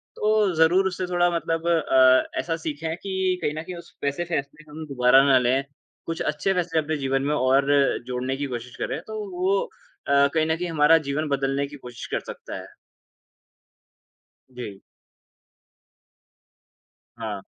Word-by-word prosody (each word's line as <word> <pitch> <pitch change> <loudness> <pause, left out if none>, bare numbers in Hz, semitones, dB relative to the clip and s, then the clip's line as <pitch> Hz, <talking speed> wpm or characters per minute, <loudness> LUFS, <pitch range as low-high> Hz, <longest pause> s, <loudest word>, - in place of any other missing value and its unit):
तो 215 -2 +2
ज़रूर 175 +4 +4
उससे 185 0 -3
थोड़ा 175 0 +2
मतलब 165 0 -2
अ, 130 -6 +4
ऐसा 165 -1 -1
सीखें 160 +2 -3
कि 190 -1 -1
कहीं 150 - -1
न 155 +1 -5
कहीं 180 +1 -7
उस 170 0 -13
वैसे 140 +4 -1
फैसले 150 +1 -4
हम 155 +1 -7
दोबारा 130 0 +5
ना 130 - +7
लें। 125 +2 +1 0.4
कुछ 165 0 -4
अच्छे 150 +6 0
फैसले 175 -3 0
अपने 155 +1 -1
जीवन 135 -1 0
में 150 - +1
और 135 +1 +2 0.4
जोड़ने 130 +1 -2
की 145 - -2
कोशिश 125 -1 -6
करें, 145 - -3
तो 220 0 -5 0.2
वो 190 +2 +2 0.5
अ, 140 0 +5
कहीं 160 -1 +2
न 160 0 +1
कहीं 175 +1 -3
हमारा 160 0 +5
जीवन 150 +3 -1
बदलने 135 0 0
की 145 - -11
कोशिश 125 -3 -9
कर - - +1
सकता - - -9
है। - - -12 1.8
जी। 120 -6 -8 2.4
हाँ। 110 -3 -4
150 Hz, 155 wpm, -24 LUFS, 135-170 Hz, 2.4 s, ना